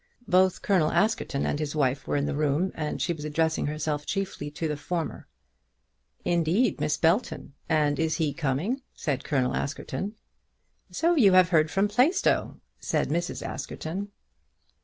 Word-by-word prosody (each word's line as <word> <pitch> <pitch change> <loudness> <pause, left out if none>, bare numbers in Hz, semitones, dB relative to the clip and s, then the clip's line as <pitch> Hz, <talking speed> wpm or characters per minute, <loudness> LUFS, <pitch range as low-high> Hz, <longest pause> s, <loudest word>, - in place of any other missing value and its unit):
Both 185 -2 +3
Colonel 180 -6 +3
Askerton 215 -10 +1
and 145 - -1
his 150 -1 -3
wife 135 -2 0
were - - 0
in 140 0 +1
the 150 - -2
room, 150 +5 +1
and 150 -1 -3
she 175 - 0
was 155 -3 -8
addressing 160 0 0
herself 150 0 -2
chiefly 190 -5 -3
to 155 +2 -3
the 150 - -2
former. 165 +3 -4 1.0
"Indeed, 175 +6 +1
Miss 150 - +1
Belton! 170 - 0 0.2
And 150 -2 +2
is 160 -1 +1
he 155 -4 0
coming?" 165 - -1
said 140 -4 -2
Colonel 130 -4 0
Askerton. 195 +8 -3 0.7
"So 335 +1 +1
you 220 - +5
have 185 -2 +6
heard 155 -3 +3
from 195 +5 +2
Plaistow?" 265 - +2 0.2
said - - -1
Mrs. 170 +3 -2
Askerton. 185 +6 -5
160 Hz, 155 wpm, -27 LUFS, 150-190 Hz, 1.0 s, have